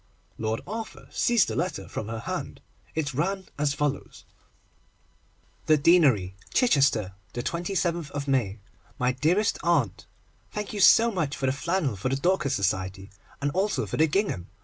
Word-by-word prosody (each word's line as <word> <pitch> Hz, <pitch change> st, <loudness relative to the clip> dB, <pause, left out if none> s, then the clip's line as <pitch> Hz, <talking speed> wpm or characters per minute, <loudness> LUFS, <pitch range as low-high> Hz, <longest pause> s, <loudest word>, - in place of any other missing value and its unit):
Lord 110 Hz, 0 st, -1 dB
Arthur 225 Hz, +1 st, -7 dB
seized 235 Hz, -4 st, +3 dB
the -, -, -3 dB
letter 170 Hz, -1 st, -2 dB
from 105 Hz, -, -5 dB
her 110 Hz, 0 st, -5 dB
hand. -, -, -5 dB, 0.4 s
It 150 Hz, -2 st, -1 dB
ran 190 Hz, +7 st, -1 dB
as 145 Hz, -1 st, +1 dB
follows:— 145 Hz, -1 st, -3 dB, 1.4 s
THE 155 Hz, -, +6 dB
DEANERY, 140 Hz, -, +4 dB, 0.2 s
CHICHESTER, 135 Hz, -, +3 dB, 0.2 s
27_th_ 170 Hz, 0 st, -2 dB
May. 120 Hz, -7 st, +1 dB, 0.4 s
My 125 Hz, 0 st, +2 dB
Dearest 165 Hz, +11 st, +1 dB
Aunt, 155 Hz, -, 0 dB, 0.5 s
Thank 210 Hz, 0 st, -4 dB
you 205 Hz, -, -3 dB
so 225 Hz, +5 st, +7 dB
much 155 Hz, -8 st, -2 dB
for 135 Hz, -, -2 dB
the 130 Hz, -, +3 dB
flannel 150 Hz, -, -1 dB
for 100 Hz, +7 st, -2 dB
the 135 Hz, -, +1 dB
Dorcas 155 Hz, -1 st, +1 dB
Society, 95 Hz, 0 st, -2 dB, 0.3 s
and 145 Hz, -, +1 dB
also 195 Hz, +6 st, 0 dB
for -, -, -4 dB
the 160 Hz, -, +4 dB
gingham. 155 Hz, -, -1 dB
150 Hz, 150 wpm, -26 LUFS, 125-180 Hz, 1.4 s, so